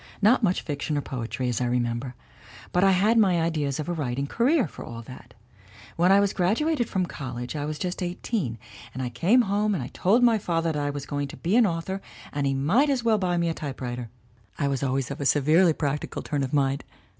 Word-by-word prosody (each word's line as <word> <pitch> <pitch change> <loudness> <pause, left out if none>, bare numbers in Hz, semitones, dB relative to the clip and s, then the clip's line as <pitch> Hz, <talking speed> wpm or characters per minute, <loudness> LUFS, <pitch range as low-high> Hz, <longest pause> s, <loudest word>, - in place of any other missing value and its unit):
Not 220 +5 +4
much 185 -5 +1
fiction 145 0 -2
or - - 0
poetry, 125 -1 -4
as 120 0 -1
I - - +1
remember. 120 +1 -1 0.6
But 180 - +2
I 195 - +6
had 205 +5 +4
my 185 -5 +4
ideas 155 -4 -1
of 155 - -3
a 175 - -1
writing 140 -4 -2
career, 245 - +2
for - - -10
all 115 0 -8
that. 125 +2 -13 0.6
When 175 +3 +3
I 195 - +7
was 200 -1 +2
graduated 240 - +1
from 185 -1 0
college 125 -4 -6
I 145 -1 -2
was 150 0 -4
just 180 +2 -3
eighteen 175 - -2 0.4
and 130 - -3
I 125 - -2
came 180 - +3
home 205 0 +1
and 130 -8 -5
told 220 +7 +3
my 230 -3 +5
father 165 -3 0
that 150 -1 -2
I 145 - -1
was 145 -1 -5
going 145 -1 -3
to - - -10
be 180 +6 0
an 235 -3 +6
author 185 +3 -3 0.3
and 145 -1 0
he 135 - 0
might 195 - +3
as 265 -4 0
well 225 -2 +3
buy 180 -2 0
me 170 0 +1
a 165 - 0
typewriter 125 -6 -5 0.5
I 140 - 0
was 135 -1 -1
always 135 -1 -1
of 140 - -5
a - - -2
severely 155 +6 +4
practical 145 -1 -3
turn 145 -2 -2
of 135 -1 -2
mind. 140 -1 +1
155 Hz, 225 wpm, -26 LUFS, 135-195 Hz, 0.6 s, I